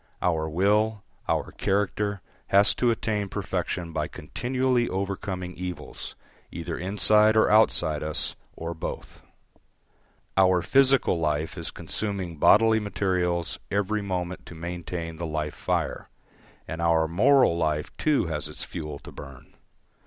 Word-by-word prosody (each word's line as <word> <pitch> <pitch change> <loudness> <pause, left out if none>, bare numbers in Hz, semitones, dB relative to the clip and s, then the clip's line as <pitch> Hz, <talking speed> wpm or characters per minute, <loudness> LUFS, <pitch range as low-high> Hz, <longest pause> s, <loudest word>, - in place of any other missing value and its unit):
Our 80 -3 0
will, 105 +5 +2 0.3
our - - 0
character, 100 0 -1 0.2
has 100 +1 +5
to 125 - +1
attain 105 -3 -1
perfection 85 -1 -3
by - - -1
continually 125 -1 -1
overcoming 95 -1 -3
evils, 90 -5 -6 0.4
either 85 0 -4
inside 105 +3 +4
or 110 - +4
outside 80 -8 +3
us, 75 0 0 0.2
or 85 +1 -4
both; 80 - -7 1.1
our 95 -2 +4
physical 135 -9 +4
life 75 -1 -1
is - - -4
consuming 95 -6 -4
bodily 110 +7 +5
materials 90 -4 -1
every 105 +1 0
moment 90 -2 -4
to 85 - -10
maintain 85 -1 -5
the 85 0 -4
life 75 -1 -3
fire; - - -2 0.6
and 80 +3 -5
our 80 -1 +3
moral 120 - +4
life 75 -3 -1
too 150 -8 +2
has 75 -2 -2
its 75 - -7
fuel 75 -2 -6
to - - -12
burn. 70 -3 -12
90 Hz, 130 wpm, -26 LUFS, 80-105 Hz, 1.1 s, has